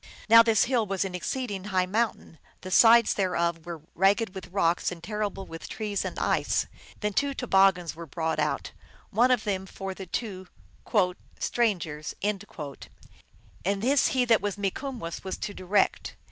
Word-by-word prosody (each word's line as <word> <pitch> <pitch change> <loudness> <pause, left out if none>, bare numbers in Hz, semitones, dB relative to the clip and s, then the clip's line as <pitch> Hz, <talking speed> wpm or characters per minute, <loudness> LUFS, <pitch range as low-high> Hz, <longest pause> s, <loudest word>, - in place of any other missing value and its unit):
Now 230 +1 +9
this 225 -3 +4
hill 235 -4 +1
was 195 0 -1
an 190 - -5
exceed 245 +6 -3
ing 190 -1 -5
high 185 -3 +1
mountain; 205 -5 -2 0.2
the 185 - -7
sides 230 +3 +7
thereof 170 -3 -1
were 170 -3 -6
ragged 195 +2 +2
with 190 -2 -8
rocks 175 -2 +1
and 170 -2 -9
terrible 205 0 -3
with 165 0 -9
trees 210 -2 -2
and - - -5
ice. - - +1 0.4
Then 210 -1 -1
two 280 +5 0
toboggins 195 -8 +3
l - - -18
were 170 - -7
brought 160 +2 -2
out, - - -1 0.4
one 245 +3 +4
of 250 -3 +2
them 190 -2 -2
for 195 0 -6
the 190 0 -9
two 190 -2 -4 0.9
"strangers, 175 -10 -1
and 205 -1 0 1.2
this 210 +9 +2
he 255 -1 +1
that 230 -2 +4
was 205 -1 -2
Mikumwess 200 -2 -4
was 190 - -4
to 205 - -5
direct. 190 +2 0
195 Hz, 165 wpm, -27 LUFS, 180-225 Hz, 1.2 s, Now